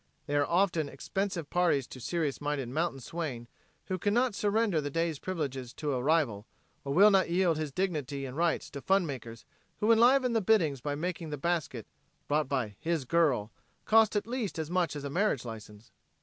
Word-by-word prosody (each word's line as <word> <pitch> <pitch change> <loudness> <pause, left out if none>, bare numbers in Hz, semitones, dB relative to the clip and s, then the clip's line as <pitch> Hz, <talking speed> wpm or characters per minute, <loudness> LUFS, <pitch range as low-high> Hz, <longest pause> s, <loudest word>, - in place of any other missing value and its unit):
They 145 - -2
are 145 0 +2
often 170 -4 +1
expensive 180 +3 -3
parties 170 -7 +2
to 130 - -9
a - - -12
serious 155 -1 -2
minded 145 -4 -2
mountain 155 +1 -1
swain 130 -6 -5 0.4
who 185 -1 -3
can 205 +4 +1
not 245 -1 +2
surrender 205 -4 +1
the 145 - -3
day's 165 0 -1
privileges 135 -9 -4
to 150 -2 -2
a 125 - -1
rival 130 -8 +1 0.4
or 140 - -4
will 200 +8 +7
not 190 -3 +3
yield 170 -2 +2
his 155 -2 -3
dignity 145 -6 -2
and 130 0 -7
rights 170 +1 0
to 140 - -7
fun 195 +4 +2
makers 120 -6 -7 0.3
who 215 +2 +3
enliven 245 +2 +5
the 225 - +2
biddings 170 - +2
by 145 +1 -2
making 170 +1 -4
the 150 - -4
basket, 155 -7 -2 0.4
brought 150 -1 +1
by 125 -7 -1
"his 160 -3 -1
girl," 135 -9 +2 0.3
cost 220 -1 +4
at 205 - 0
least 235 -6 -3
as 160 0 -4
much 175 -4 +1
as 145 - -5
a 140 - -3
marriage 175 - +1
license. 110 -1 -10
160 Hz, 195 wpm, -30 LUFS, 140-185 Hz, 0.4 s, will